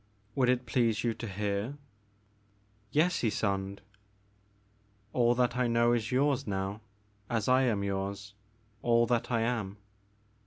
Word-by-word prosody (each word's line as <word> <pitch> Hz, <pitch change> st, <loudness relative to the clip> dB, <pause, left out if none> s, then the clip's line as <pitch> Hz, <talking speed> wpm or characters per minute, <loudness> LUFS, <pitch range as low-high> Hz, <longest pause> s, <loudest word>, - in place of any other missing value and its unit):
Would 125 Hz, 0 st, +2 dB
it 125 Hz, 0 st, +1 dB
please 115 Hz, -2 st, +1 dB
you 120 Hz, -1 st, +1 dB
to 115 Hz, +1 st, -6 dB
hear? 100 Hz, +6 st, -2 dB, 0.3 s
' 105 Hz, 0 st, -38 dB
* 100 Hz, 0 st, -37 dB, 0.3 s
'*Yes, 170 Hz, +4 st, +2 dB
Ysonde." 100 Hz, -3 st, -1 dB, 1.3 s
All 120 Hz, -1 st, +3 dB
that 125 Hz, -1 st, +1 dB
I 125 Hz, -1 st, +2 dB
know 120 Hz, 0 st, +3 dB
is 110 Hz, -2 st, -1 dB
yours, 135 Hz, 0 st, +2 dB
now, 95 Hz, +1 st, -3 dB, 0.5 s
as 115 Hz, -4 st, -1 dB
I 130 Hz, +1 st, +5 dB
am 105 Hz, -5 st, +1 dB
yours, 100 Hz, +1 st, -3 dB, 0.5 s
all 120 Hz, 0 st, +4 dB
that 120 Hz, -1 st, 0 dB
I 115 Hz, -2 st, +1 dB
am. 115 Hz, -4 st, -1 dB
115 Hz, 145 wpm, -30 LUFS, 100-125 Hz, 1.3 s, I